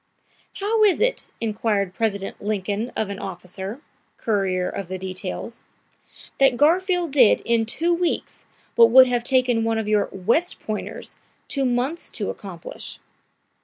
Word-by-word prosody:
"How 430 +2 +1
is 400 -5 +4
it," - - 0
inquired 210 -3 -1
President 200 -3 -2
Lincoln 210 +2 -2
of 210 -2 -2
an 200 - -6
officer, 190 - -6 0.4
courier 190 -4 0
of 195 - -5
the 185 +1 -4
details, 185 +4 -6 0.8
"that 270 -2 +4
Garfield 350 +2 +2
did 255 -6 +5
in 230 -1 +1
two 335 +9 +1
weeks 345 0 -2 0.3
what 230 -1 +7
would 260 +2 +9
have 245 -1 0
taken 250 -3 +2
one 225 0 0
of 220 -1 -2
your 210 -1 +2
West 235 - 0
Pointers 215 -1 -5 0.3
two 275 -2 -1
months 255 +7 -1
to 210 - -3
accomplish?" 185 -5 -9
225 Hz, 140 wpm, -23 LUFS, 200-270 Hz, 0.8 s, would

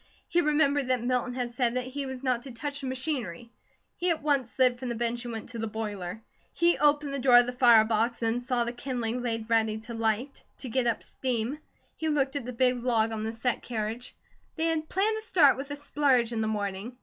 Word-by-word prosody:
He 345 - +2
remembered 295 -3 +2
that 255 -2 +1
Milton 250 0 0
had 245 -2 -2
said 240 -1 0
that 255 -1 -1
he 275 +1 -4
was 260 0 -7
not 250 -3 +1
to 265 - -9
touch 280 +4 -4
the 270 - -4
machinery. 250 - -4 0.4
He 360 - -1
at 325 -3 0
once 280 -5 +1
slid 250 -1 +2
from 255 -1 -4
the 235 - -2
bench 235 +1 -2
and 240 - -4
went 225 0 -6
to 235 -2 -7
the 225 - -2
boiler. 210 -2 -5 0.3
He 340 0 +3
opened 295 -1 +2
the 275 - -2
door 250 -1 +6
of 245 - +7
the 250 - -4
fire 240 -3 +6
box 230 +2 0
and 230 +2 0
saw 245 -1 0
the 235 - -3
kindling 245 -1 -3
laid 225 -2 -3
ready 220 -1 +2
to 235 +2 -8
light, 225 +4 -1
to 255 - -7
get 245 +1 +1
up 230 - 0
steam. 255 +2 -3 0.4
He 320 - -1
looked 280 -2 +1
at 280 -4 -3
the - - -3
big 250 0 +1
log 225 -2 +2
on 220 -1 -3
the 220 - -2
set 230 +2 -1
carriage. 225 +1 -4 0.4
They 320 - 0
had 320 -1 -1
planned 425 +4 +1
to - - -5
start 320 -11 +5
with 275 +2 -6
a 290 - -3
splurge 280 -5 +1
in 225 - -1
the 220 - 0
morning. 205 +2 -3
245 Hz, 235 wpm, -28 LUFS, 230-275 Hz, 0.4 s, of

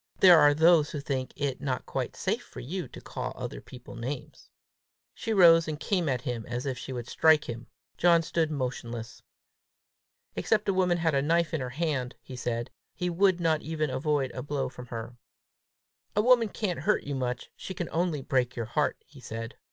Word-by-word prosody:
There 180 -3 +9
are 145 -1 +6
those 160 -1 +5
who 150 - -4
think 135 -2 -3
it 140 -3 -2
not 130 -3 -2
quite - - -3
safe - - -1
for - - -11
you - - -4
to - - -11
call - - -5
other - - -6
people 125 -1 -12
names!" 125 +3 -6 0.6
She 225 - -4
rose 165 -5 +7
and 155 -1 -3
came 180 -5 0
at 125 -2 0
him 120 -4 -3
as 120 +2 -3
if 135 -2 -1
she 135 - -7
would 120 -2 -5
strike 155 -1 +4
him. 120 0 -6 0.3
John 170 -1 +5
stood 165 -1 0
motionless. 125 -4 -4 1.1
Except 215 -1 +1
a 195 - +3
woman 180 -2 +2
had 165 -2 +1
a 140 - +3
knife 165 +3 +1
in 160 - 0
her 125 - -3
hand, 140 -3 -2
he 130 - -9
said, 120 -1 -3 0.2
he 180 +1 -1
would 185 +1 +3
not 160 -2 +2
even 155 -2 -2
avoid 145 -2 0
a 130 - -5
blow 140 -1 -2
from 125 -1 -10
her. 115 +1 -7 1.0
"A 210 - +4
woman 240 -2 +5
can't 195 -4 -2
hurt 210 - +1
you 145 - -4
much; 125 -2 -3
she 190 - -7
can 175 -2 -3
only 165 -4 0
break 125 -2 0
your 115 -2 -3
heart!" 130 +5 0
he 145 - -16
said. 115 -1 -6
145 Hz, 200 wpm, -28 LUFS, 125-170 Hz, 1.1 s, There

